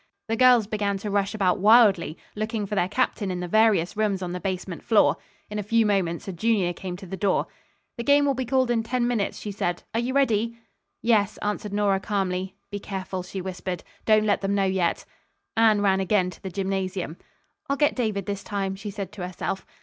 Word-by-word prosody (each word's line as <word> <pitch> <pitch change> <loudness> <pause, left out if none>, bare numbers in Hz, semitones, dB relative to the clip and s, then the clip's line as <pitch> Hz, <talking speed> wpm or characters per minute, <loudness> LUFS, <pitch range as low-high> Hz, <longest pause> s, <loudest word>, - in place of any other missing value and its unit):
The 225 - +1
girls 250 -2 +6
began 205 -1 -1
to 205 +1 -5
rush 200 +1 0
about 190 -3 +2
wildly, 200 -6 +5 0.2
looking 215 0 -2
for 200 - -6
their 180 -3 +2
captain 215 -3 0
in 180 -1 -3
the 180 - -3
various 215 -3 +3
rooms 205 -3 0
on 175 - -3
the 180 - -4
basement 185 -2 -4
floor. 170 -10 +4 0.3
In 210 0 -4
a - - 0
few 225 +2 +2
moments 190 -5 0
a 190 - -4
junior 190 -1 +1
came 180 0 -6
to 195 - -10
the 190 +1 -5
door. 190 0 +1 0.5
"The 235 - -3
game 285 +2 +4
will 280 - +2
be 260 0 -2
called 260 -1 +2
in 230 -1 +2
ten 240 +1 0
minutes," 230 -5 -1
she 210 - -5
said. 175 -3 -2
"Are 225 - +1
you 250 +3 -2
ready?" 235 -4 +2 0.5
"Yes," 215 -3 +2
answered 210 0 -2
Nora 205 -1 +2
calmly. 190 -2 -2 0.2
"Be 205 - -3
careful," 190 -2 -5
she 185 +1 -6
whispered. 180 -1 -5 0.2
"Don't 215 -1 +4
let 205 -1 +2
them 200 0 0
know 200 - +2
yet." 190 -3 0 0.5
Anne 220 -2 +4
ran 190 -1 +3
again 190 -1 +1
to 165 - -15
the 190 - -5
gymnasium. 190 -2 -3 0.5
"I'll 280 - +1
get 295 0 +3
David 215 -6 -1
this 200 -1 -4
time," 195 -2 -2
she 200 +2 -7
said 200 -2 -6
to 205 -3 -7
herself. 185 +1 -4
200 Hz, 210 wpm, -25 LUFS, 190-220 Hz, 0.5 s, girls